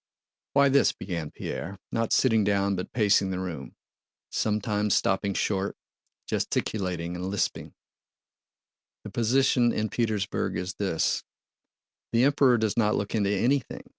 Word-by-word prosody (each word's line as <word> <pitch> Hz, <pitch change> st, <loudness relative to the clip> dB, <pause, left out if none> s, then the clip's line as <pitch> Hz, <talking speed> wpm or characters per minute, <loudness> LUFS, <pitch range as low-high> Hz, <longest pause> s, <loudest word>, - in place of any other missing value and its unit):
"Why 140 Hz, 0 st, +5 dB
this," 140 Hz, +1 st, +4 dB
began 85 Hz, -5 st, -5 dB
Pierre, 100 Hz, +6 st, -6 dB
not 115 Hz, -1 st, -1 dB
sitting 115 Hz, -5 st, +4 dB
down 100 Hz, -1 st, +1 dB
but 90 Hz, -, -5 dB
pacing 100 Hz, -4 st, +3 dB
the 95 Hz, -, -2 dB
room, 90 Hz, -7 st, -6 dB, 0.6 s
sometimes 105 Hz, -1 st, 0 dB
stopping 100 Hz, 0 st, +1 dB
short, 100 Hz, -1 st, -1 dB, 0.5 s
gesticulating, 90 Hz, -4 st, -2 dB
and 90 Hz, +1 st, -4 dB
lisping: 100 Hz, 0 st, -2 dB, 1.3 s
"the -, -, -8 dB
position 120 Hz, +1 st, +3 dB
in 110 Hz, -1 st, -1 dB
Petersburg 110 Hz, -4 st, -1 dB
is 90 Hz, +1 st, -3 dB
this: 95 Hz, -6 st, 0 dB, 0.9 s
the 115 Hz, +1 st, +3 dB
Emperor 135 Hz, -3 st, +4 dB
does 110 Hz, -2 st, 0 dB
not 105 Hz, -2 st, +2 dB
look 100 Hz, -, -3 dB
into 100 Hz, -3 st, +1 dB
anything. 120 Hz, +6 st, 0 dB
105 Hz, 130 wpm, -27 LUFS, 95-115 Hz, 1.3 s, Why